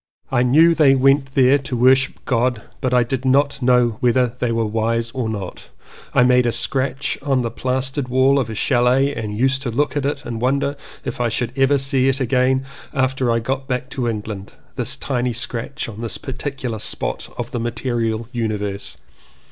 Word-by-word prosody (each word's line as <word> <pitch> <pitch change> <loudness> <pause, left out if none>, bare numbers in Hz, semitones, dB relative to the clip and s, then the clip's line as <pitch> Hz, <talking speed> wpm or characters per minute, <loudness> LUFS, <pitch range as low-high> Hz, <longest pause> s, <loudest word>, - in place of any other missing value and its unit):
I 125 -2 +2
knew 155 +7 +5
they 145 -4 +5
went 135 +1 +2
there 135 +1 +5
to 130 -2 -4
worship 130 +2 +3
God 120 -2 0 0.2
but 130 - 0
I 125 -1 +4
did 130 +2 -3
not 140 +1 +2
know 125 -3 +3
whether 125 -1 +2
they 125 -2 0
were 115 -1 0
wise 115 +2 -1
or 125 -3 -2
not. 100 -4 -6 0.4
I - - +4
made 125 0 +4
a - - +2
scratch 135 +3 -1
on 135 -3 +1
the 115 - -2
plastered 130 +2 -2
wall 130 +2 +3
of 120 -4 -2
a 110 - -5
chalet 130 +4 +2
and 105 -4 -4
used 135 +3 +1
to 135 - -3
look 145 +6 0
at 140 -1 0
it 145 -1 -3
and 115 -1 -5
wonder 140 +3 +1 0.3
if 125 0 -4
I 120 - +1
should 120 +1 -2
ever 135 +1 +3
see 135 -1 +1
it 135 +1 0
again 130 +1 +1 0.3
after 130 -1 +1
I 115 - +2
got 135 +4 -3
back 125 0 -3
to 125 -3 -2
England 105 -3 -5
— - - -34
this - - -2
tiny 125 -2 -1
scratch 120 -1 -3
on 110 -1 -8
this 115 - -2
particular 130 -3 -5
spot - - -3
of 120 +1 -5
the 120 - -3
material 115 -1 -2
universe. 105 -4 -3
125 Hz, 195 wpm, -20 LUFS, 115-135 Hz, 0.4 s, knew